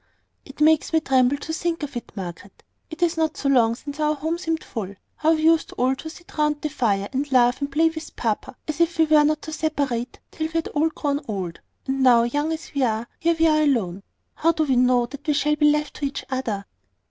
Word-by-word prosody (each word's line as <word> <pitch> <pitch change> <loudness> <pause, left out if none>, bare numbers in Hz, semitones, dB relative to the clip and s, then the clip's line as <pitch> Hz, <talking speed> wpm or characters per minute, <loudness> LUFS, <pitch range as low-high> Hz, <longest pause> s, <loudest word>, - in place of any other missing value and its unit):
"It 275 - -13
makes 310 +1 +3
me 320 - +5
tremble 265 -2 +2
to 320 - -6
think 335 -1 -2
of 285 -3 -5
it, 240 - -6
Margaret. 190 0 -8 0.3
It 330 +1 -4
is 335 -1 +1
not 320 -1 0
so 275 - -1
long 230 -4 +4
since 285 +4 -9
our 305 0 +2
home 320 +4 -2
seemed 325 -2 -2
full. 200 -4 -6 0.2
How 320 +1 +3
we 310 - -3
used 325 0 +3
all 255 +2 +1
to 315 - -7
sit 350 +2 -14
round 300 -1 +2
the 305 - -3
fire, 205 -8 0
and 275 +2 -2
laugh 245 0 +4
and 280 0 -2
play 320 +3 +3
with 320 0 -9
papa, 225 +2 -2
as 310 +2 -2
if 335 0 +2
we 320 - +5
were 305 -1 +5
not 305 +1 +1
to 315 - -6
separate 285 -7 -2
till 315 -1 -3
we 320 - -15
had 330 -1 -1
all 315 +2 +1
grown 290 -2 -2
old: 185 -6 -4 0.3
and 270 0 -1
now, 245 -3 +6
young 290 +6 -1
as 320 +1 -6
we 280 - -1
are, 225 -2 0
here 335 +1 +2
we 325 - +3
are 310 -1 +4
alone! 215 -11 +1 0.3
How 330 +1 +2
do 315 - +1
we 270 -4 +1
know 250 -1 +3
that 280 +5 -11
we 300 - +3
shall 300 +1 +2
be 300 0 +4
left 300 -1 -1
to 290 - -2
each 275 - -4
other?" 225 -7 -2
290 Hz, 240 wpm, -23 LUFS, 250-315 Hz, 0.3 s, now